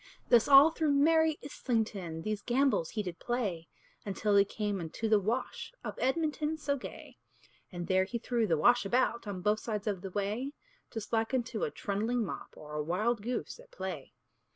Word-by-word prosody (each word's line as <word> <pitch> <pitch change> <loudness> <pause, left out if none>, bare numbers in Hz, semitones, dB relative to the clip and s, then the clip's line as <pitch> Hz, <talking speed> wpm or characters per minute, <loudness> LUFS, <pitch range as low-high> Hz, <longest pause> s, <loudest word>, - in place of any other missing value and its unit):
Thus 235 -2 +6
all 285 +3 +9
through 315 -3 +1
merry 320 +2 +4
Islington 215 - -2
These 215 -1 -2
gambols 245 - +2
he 215 -1 -3
did 180 -3 -6
play, 200 -10 -2 0.4
Until 205 +1 0
he 200 - +7
came 205 0 -3
unto 170 +7 -3
the 215 -1 +5
Wash 225 +6 -2
Of - - -4
Edmonton 305 +2 0
so 285 -2 -1
gay; 260 - -9 0.5
And 175 -2 -5
there 190 +1 +3
he 235 +5 -3
threw 235 -1 0
the 165 -4 +2
Wash 240 +10 +5
about 235 +1 +1
On 195 -3 -4
both 210 +2 +2
sides 210 -3 -4
of 200 -4 -1
the 195 - -5
way, 210 +8 -2 0.4
Just 225 -1 -7
like 225 +3 +1
unto 245 -2 -2
a - - -2
trundling 225 - -1
mop, - - -6
Or 150 0 -10
a 150 - -1
wild 210 +8 0
goose 245 - -4
at - - -15
play. - - -6
225 Hz, 185 wpm, -31 LUFS, 200-260 Hz, 0.5 s, all